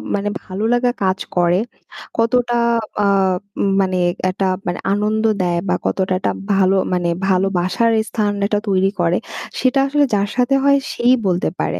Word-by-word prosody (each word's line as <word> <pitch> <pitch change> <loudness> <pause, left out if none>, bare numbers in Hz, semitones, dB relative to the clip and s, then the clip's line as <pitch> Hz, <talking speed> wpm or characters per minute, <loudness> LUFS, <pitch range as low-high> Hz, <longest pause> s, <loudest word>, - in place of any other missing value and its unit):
মানে 205 +1 -1
ভালো 190 +3 -5
লাগা 245 0 +2
কাজ 190 0 +1 0.2
করে, 175 0 +3 0.6
কতটা 240 +1 +1 0.5
আ - - +2 0.6
উম 200 - +2
মানে 185 -1 0 0.3
একটা 185 +1 0 0.2
মানে 175 - -2
আনন্দ 210 +2 0 0.2
দেয় 175 -1 0
বা 180 - +2
কতটা 190 -1 0
একটা 185 - -1 0.2
ভালো 195 0 +3 0.2
মানে 175 -1 0 0.2
ভালোবাসার 190 +3 +1 0.2
স্থান 210 -2 0
এটা 205 0 0
তৈরি 190 -1 +2
করে, 170 +1 +2 0.4
সেটা 260 +2 +2
আসলে 290 +1 +2
যার 200 0 +1
সাথে 250 +2 +2
হয় 280 0 +5 0.2
সেই 240 +1 +3
বলতে 180 -1 +1
পারে। 90 - -2
195 Hz, 160 wpm, -18 LUFS, 185-230 Hz, 0.6 s, হয়